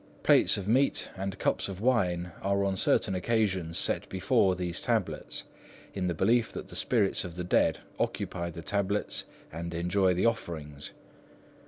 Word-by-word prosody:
Plates -, -, +5 dB
of 100 Hz, -1 st, -5 dB
meat 130 Hz, +6 st, +2 dB
and 95 Hz, 0 st, -4 dB
cups -, -, 0 dB
of 95 Hz, -1 st, -6 dB
wine 90 Hz, -7 st, +1 dB
are 100 Hz, 0 st, +1 dB
on 100 Hz, -1 st, 0 dB
certain 95 Hz, -, +2 dB
occasions 95 Hz, -4 st, 0 dB
set -, -, 0 dB
before 95 Hz, 0 st, +2 dB
these 90 Hz, -2 st, -3 dB
tablets, -, -, -1 dB, 0.5 s
in 95 Hz, -2 st, -2 dB
the 90 Hz, -, -1 dB
belief 115 Hz, +8 st, +2 dB
that -, -, -7 dB
the -, -, -9 dB
spirits 110 Hz, -6 st, +1 dB
of 90 Hz, -3 st, -7 dB
the 90 Hz, -, -4 dB
dead 90 Hz, -, +2 dB, 0.2 s
occupy 85 Hz, 0 st, -2 dB
the 85 Hz, 0 st, -8 dB
tablets 100 Hz, +4 st, -1 dB, 0.3 s
and 85 Hz, +1 st, -5 dB
enjoy 90 Hz, +2 st, +2 dB
the 90 Hz, -, +1 dB
offerings. 80 Hz, -11 st, -3 dB
95 Hz, 160 wpm, -29 LUFS, 85-100 Hz, 0.5 s, Plates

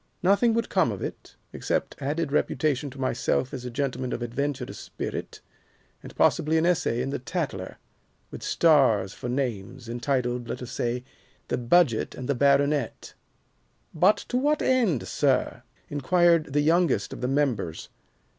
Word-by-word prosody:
Nothing 200 Hz, +5 st, +4 dB
would 230 Hz, -1 st, 0 dB
come 185 Hz, -, +2 dB
of 100 Hz, -, -5 dB
it, -, -, -7 dB, 0.2 s
except -, -, -2 dB
added 150 Hz, +2 st, -1 dB
reputation 145 Hz, -1 st, 0 dB
to 135 Hz, +1 st, -12 dB
myself 130 Hz, +1 st, 0 dB
as 125 Hz, -2 st, -6 dB
a -, -, -3 dB
gentleman 130 Hz, 0 st, -2 dB
of 120 Hz, -, -3 dB
adventurous 130 Hz, +2 st, -3 dB
spirit, -, -, -6 dB, 0.6 s
and -, -, -11 dB
possibly 155 Hz, +2 st, +3 dB
an 160 Hz, -, +2 dB
essay 165 Hz, -9 st, +1 dB
in 135 Hz, -, -3 dB
the -, -, -2 dB
'Tatler,' 130 Hz, -, -4 dB, 0.5 s
with -, -, -8 dB
stars 130 Hz, -, +3 dB
for 125 Hz, -, -6 dB
names, 120 Hz, -3 st, -3 dB
entitled, 120 Hz, 0 st, -1 dB
let 120 Hz, -, -5 dB
us 125 Hz, -, -8 dB
say, 120 Hz, 0 st, -2 dB, 0.5 s
'The -, -, 0 dB
Budget 125 Hz, -1 st, +2 dB
and 130 Hz, -, -6 dB
the 140 Hz, -, +2 dB
Baronet.'" 140 Hz, 0 st, +1 dB, 0.8 s
"But 185 Hz, +6 st, +4 dB
to 250 Hz, -, 0 dB
what 295 Hz, +4 st, +1 dB
end, 230 Hz, -, +2 dB
sir?" 130 Hz, -4 st, +1 dB, 0.3 s
inquired 165 Hz, +1 st, +2 dB
the 145 Hz, -, +3 dB
youngest 155 Hz, -, +2 dB
of -, -, -8 dB
the 125 Hz, -, 0 dB
members. 125 Hz, -, -1 dB
140 Hz, 155 wpm, -26 LUFS, 125-160 Hz, 0.8 s, Nothing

